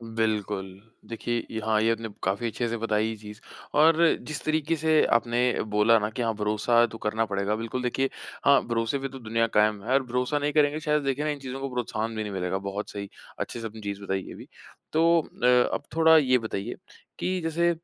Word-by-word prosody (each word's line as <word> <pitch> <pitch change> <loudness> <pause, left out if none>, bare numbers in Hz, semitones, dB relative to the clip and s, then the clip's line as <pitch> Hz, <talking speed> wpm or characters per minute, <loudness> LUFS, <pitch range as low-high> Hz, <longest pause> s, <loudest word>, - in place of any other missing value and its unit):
बिल्कुल। 105 -3 -1 0.4
देखिए 115 0 -2
ये 110 - -3
हाँ, 110 -1 +2
ये 115 - +3
आपने 115 0 -3
काफ़ी 100 +5 0
अच्छे 120 +1 -2
से 115 - -2
बताई 110 -1 0
ये 110 - -3
चीज़ 105 0 -11 0.4
और 160 +1 +6 0.3
जिस 155 -1 -4
तरीक़े 155 +1 +1
से 155 0 +3
आपने 120 +1 -2 0.4
बोला 110 +2 +5
ना 105 - -1
कि 115 +3 -5
हाँ 115 -1 +1
भरोसा 105 +3 +2
तो 115 - -8
करना 110 +1 -1
पड़ेगा। 100 0 -1
बिल्कुल 115 +3 -4
देखिए 135 +2 0 0.4
हाँ, 140 0 +6
भरोसे 115 +3 0
पे 135 - -3
तो 135 0 -9
दुनिया 115 0 0
कायम 105 -1 +3
है 125 +5 -1
और 135 - +3
भरोसा 125 +4 -1
नहीं 145 +1 -1
करेंगे 150 0 +3
शायद 150 -1 0
देखिए 135 +2 -1
ना 150 - +1
इन 145 - -5
चीज़ों 135 0 -6
को 135 - -3
प्रोत्साहन 115 -2 -2
भी 110 - -2
नहीं 105 - -5
मिलेगा। 90 0 -1
बहुत 100 +1 -5
सही 100 -1 -6 0.3
अच्छे - - -4
से 115 - -6
आपने 110 0 -11
चीज़ 100 -1 -5
बताई 95 -1 -2
ये - - -8
भी। - - -11 0.5
तो 165 +1 +4 0.2
अ - - +5 0.3
अब - - -2
थोड़ा 160 0 +6
ये 130 -4 +4
बताइए 110 -1 -4 0.4
कि 185 0 -1
जैसे 165 +1 +1
115 Hz, 220 wpm, -26 LUFS, 105-140 Hz, 0.5 s, और